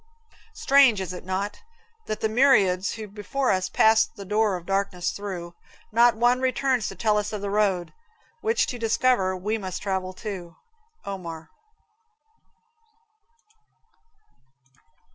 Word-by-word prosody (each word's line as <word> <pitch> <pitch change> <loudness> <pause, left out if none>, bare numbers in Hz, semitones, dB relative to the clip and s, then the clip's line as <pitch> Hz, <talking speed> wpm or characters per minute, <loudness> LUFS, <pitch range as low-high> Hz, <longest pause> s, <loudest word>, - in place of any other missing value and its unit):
Strange 270 -6 +5
is 185 -1 -4
it 180 - -8
not? 190 +3 -3 0.5
that - - -1
of - - -28
the - - +2
myriads 205 -7 +3
who 220 -2 -7
Before 210 +7 -2
us 185 0 0
passed 220 +3 +3
the 200 -3 -9
door 210 -1 +1
of 175 - -12
darkness 195 -2 -1
through, 180 -4 -6 0.4
Not 235 +2 +5
one 245 +3 +2
returns 260 -3 +1
to - - -6
tell 215 -2 +1
us 210 0 -4
of 210 -2 -5
the 200 -1 -3
road, 195 -4 0 0.5
Which 450 +2 +1
to 245 - -6
discover, 225 -4 +1
we 210 +4 -2
must 185 -3 -6
travel 190 -2 -2
too? 185 -4 -7 0.5
Omar. 170 -5 -7
205 Hz, 135 wpm, -25 LUFS, 185-230 Hz, 0.5 s, Strange